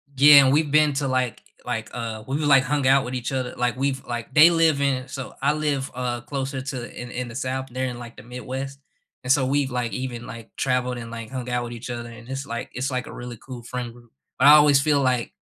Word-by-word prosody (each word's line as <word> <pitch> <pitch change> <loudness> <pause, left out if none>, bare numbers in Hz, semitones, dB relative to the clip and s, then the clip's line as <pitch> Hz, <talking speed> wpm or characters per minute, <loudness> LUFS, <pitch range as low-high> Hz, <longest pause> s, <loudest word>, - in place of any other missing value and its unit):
Yeah. 140 0 +8
We've 145 +1 +2
been 150 -1 +4
to, 135 0 -1
like 130 -3 -1 0.2
like, - - -3
uh 115 -2 -5
we've, 135 +4 -2
like, 140 -3 +5
hung 145 -2 0
out 135 0 +5
with 125 - -6
each 125 0 -3
other, 130 -1 -2
like, 125 -1 0
we've 135 0 -1
like 120 +2 -5
they 155 +4 +8
live 165 -4 +3
in 130 -2 0
so 130 -2 -7
I 145 +2 +3
live, 145 -3 -1
uh, 120 -1 -3
closer 135 0 -4
to 130 -2 -6
in 120 - -8
in 125 0 -4
the 115 - -10
South. 130 0 -3
They're 130 +1 -2
in, 120 -1 -6
like, 120 -1 -10
the - - -11
Midwest, 130 +3 -6 0.4
and 125 - 0
so 135 -2 +4
we've, 140 0 +1
like, 125 -2 -2
even, 125 -2 -5
like, 115 -1 -10
traveled 125 -1 0
and, 115 -1 -8
like, 115 0 -7
hung 130 -2 -5
out 125 0 -1
with 120 - -7
each 115 +1 -8
other, 120 -1 -5
and 115 0 -12
it's 135 +1 -4
like 115 -4 -5
it's 130 +2 -2
like 125 -2 -3
a - - -9
really 120 -1 -8
cool 125 0 -9
friend 125 0 -5
group. 120 -1 -19 0.3
But 135 - +6
I 145 - +11
always 145 -2 +6
feel 145 -2 +2
like 125 -2 0
130 Hz, 250 wpm, -24 LUFS, 120-140 Hz, 0.4 s, I